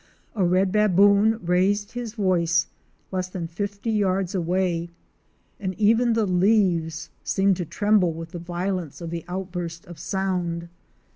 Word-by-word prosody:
A 200 - 0
Red 185 +2 +2
"Baboon"? 205 +1 +4
raised 195 +4 +1
his 240 -2 -6
voice 170 -5 +2 0.5
less 185 -1 -2
than 180 -2 -5
fifty 200 +5 -4
yards 195 -3 0
away, 175 -1 0 0.7
and 190 -3 -3
even 225 +3 +3
the 225 -1 +2
leaves 180 -4 +1
seemed 195 -1 +2
to 175 - -3
tremble 200 +1 +2
with 165 0 -8
the 175 - -6
violence 175 -2 -3
of 170 -2 -6
the 170 -1 -4
outburst 175 -2 -5
of 175 -2 -11
sound. 180 -3 -2
185 Hz, 140 wpm, -24 LUFS, 170-205 Hz, 0.7 s, Baboon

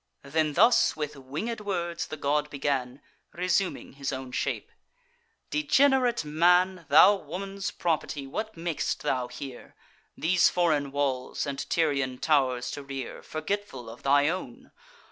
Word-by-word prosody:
Then 150 +2 0
thus, 230 +9 +5
with 150 -1 -4
winged 150 - -5
words, 175 -4 -3
the 155 - -6
god 150 +1 0
began, 135 -2 -2 0.3
Resuming 180 +2 -1
his 140 0 -4
own 130 -1 -6
shape: - - -2 0.8
"Degenerate 265 - +3
man, 180 +3 +3
Thou 165 +7 +8
woman's 195 +4 -5
property, 155 -5 -2
what 215 +9 -5
mak'st 165 -1 -2
thou 130 -4 0
here, 135 -1 -9 0.4
These 175 +2 +4
foreign 155 -6 +1
walls 135 -3 -1
and 140 -1 -4
Tyrian 140 -6 +1
tow'rs 130 -4 +1
to 145 - -6
rear, 135 -2 -6
Forgetful 155 - -4
of 120 - -13
thy 145 +1 +4
own? 180 +4 -4
150 Hz, 130 wpm, -27 LUFS, 140-180 Hz, 0.8 s, Thou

